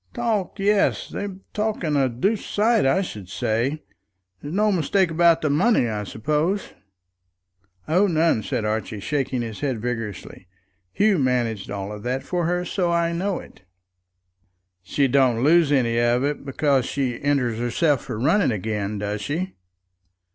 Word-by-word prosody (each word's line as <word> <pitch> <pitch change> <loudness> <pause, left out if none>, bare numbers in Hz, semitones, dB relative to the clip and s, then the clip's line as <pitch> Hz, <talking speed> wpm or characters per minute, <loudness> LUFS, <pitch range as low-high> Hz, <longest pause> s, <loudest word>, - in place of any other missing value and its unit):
"Talk, 220 -6 -1
yes; 200 0 +1
they're 200 -2 -5 0.2
talking 210 -8 -1
a 135 -2 +2
doosed 195 - -1
sight, 220 - +3
I 190 +9 +2
should 105 - -8
say. 120 +10 -1 0.6
There's 145 - -7
no 210 +1 +3
mistake 185 +1 +1
about 170 0 +4
the 155 - +2
money, 175 - +3
I 105 -2 -3
suppose?" 150 - -1 1.1
"Oh, 185 +6 +3
none," 160 - +2
said 110 - -2
Archie, 105 -1 -2
shaking 130 +1 -1
his 110 -2 -6
head 135 -6 -2
vigorously. 110 -5 -5 0.4
"Hugh 205 - +2
managed 120 -6 0
all 100 +1 -5
that 125 +5 -3
for 175 -2 -1
her, 180 +1 0
so 180 -2 0
I 170 0 +1
know 185 +2 -1
it." - - -12 1.2
"She 135 +9 +1
don't 130 -3 +3
lose 160 0 +4
any 120 -4 +2
of 120 +2 +2
it 145 0 -2
because 135 -1 +1
she 130 -4 -2
enters 135 -6 0
herself 130 +4 +1
for 110 - -5
running 170 - +3
again, 105 -1 -2
does 105 +1 -3
she?" 175 - -3
140 Hz, 150 wpm, -23 LUFS, 115-175 Hz, 1.2 s, about